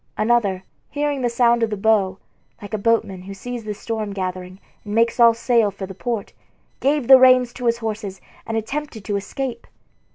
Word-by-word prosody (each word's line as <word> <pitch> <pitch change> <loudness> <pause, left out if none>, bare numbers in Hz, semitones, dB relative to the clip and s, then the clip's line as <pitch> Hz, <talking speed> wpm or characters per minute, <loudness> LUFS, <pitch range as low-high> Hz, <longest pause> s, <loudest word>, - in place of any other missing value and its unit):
Another, 215 -4 +1 0.3
hearing 290 -1 -2
the 245 - +1
sound 235 0 +3
of 230 - +1
the 210 - -3
bow, 195 -2 +2 0.4
like 205 +1 -10
a 215 - -1
boatman 205 -4 0
who 195 +2 -9
sees 240 +2 -7
the 210 -1 -4
storm 215 -1 -4
gathering 185 -1 -5 0.2
and 210 0 -5
makes 230 +1 +2
all 230 -1 +7
sail 230 -2 +2
for 195 0 -7
the 190 - -9
port, 225 +1 -4 0.5
gave 280 -2 +1
the 265 -1 +9
reins 255 -2 +5
to 250 -1 -4
his 235 0 +2
horses 215 -4 -5 0.3
and 225 0 -2
attempted 225 -1 -5
to 205 - -2
escape. 235 +4 -4
225 Hz, 190 wpm, -21 LUFS, 200-240 Hz, 0.5 s, the